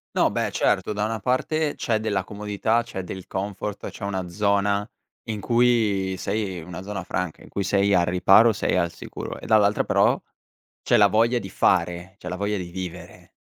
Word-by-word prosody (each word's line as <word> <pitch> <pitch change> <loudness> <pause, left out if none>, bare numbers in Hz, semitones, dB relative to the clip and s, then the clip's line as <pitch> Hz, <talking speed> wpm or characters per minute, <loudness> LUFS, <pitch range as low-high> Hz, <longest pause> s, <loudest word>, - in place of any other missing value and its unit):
No, - - +4
beh, - - -1
certo. - - +1
Da 105 0 -1
una 110 +1 -2
parte, 145 +7 0
c'è 115 -3 0
della 105 -3 -1
comodità, 105 +3 -1
c'è 115 -5 -6
del 95 +1 -7
comfort, 100 +1 -4
c'è - - -11
una 95 -3 -3
zona 100 +2 +1 0.4
in 105 -2 -3
cui 110 -5 +2
sei 100 -2 -2
in 80 0 -9
una 90 +1 -7
zona 95 -2 -5
franca, 90 -3 -3
in - - -14
cui 100 - -2
sei 100 +1 +2
al 85 - +4
riparo, 95 +6 +5
sei - - 0
al 85 0 +1
sicuro. - - -7
E - - -10
dall'altra, 105 -2 +4
però, - - +3 0.6
c'è - - +3
la 105 - +7
voglia 115 +4 +3
di 95 - -7
fare, 90 +1 0
c'è 90 - -7
la 90 - -3
voglia 100 +2 -1
di 90 -2 -5
vivere 90 -1 -8
100 Hz, 190 wpm, -24 LUFS, 95-110 Hz, 0.6 s, la